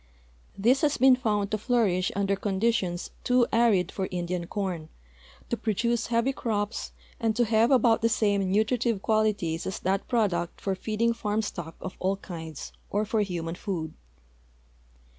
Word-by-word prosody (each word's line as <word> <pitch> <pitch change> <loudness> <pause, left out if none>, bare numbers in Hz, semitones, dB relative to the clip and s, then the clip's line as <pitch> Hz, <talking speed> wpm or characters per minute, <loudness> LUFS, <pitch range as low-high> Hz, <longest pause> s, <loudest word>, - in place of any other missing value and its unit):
This 240 +7 +3
has 295 -1 +2
been 260 0 +6
found 210 -5 -1
to 215 - 0
flourish 205 -6 +1
under 200 0 +1
conditions 195 -3 -1
too 250 -1 +4
arid 225 -7 +3
for 190 -1 -3
Indian 175 -1 -3
corn, 180 -6 -3 0.6
to - - +2
produce 230 +1 0
heavy 235 +3 +1
crops, 210 -3 -2 0.3
and 225 -2 +1
to 240 +1 +3
have 225 +1 +3
about 240 -4 +4
the 230 - +3
same 200 -4 +1
nutritive 220 0 +1
qualities 210 -7 +1
as 190 - -3
that 190 +1 0
product 190 -8 0
for 195 - -1
feeding 220 +4 0
farm 220 -1 -1
stock 170 -5 -6
of 185 - -7
all 190 +1 0
kinds 160 -6 -8 0.2
or 210 +1 0
for 220 0 +1
human 170 -4 -3
food. 170 -4 -4
205 Hz, 155 wpm, -27 LUFS, 185-230 Hz, 0.6 s, been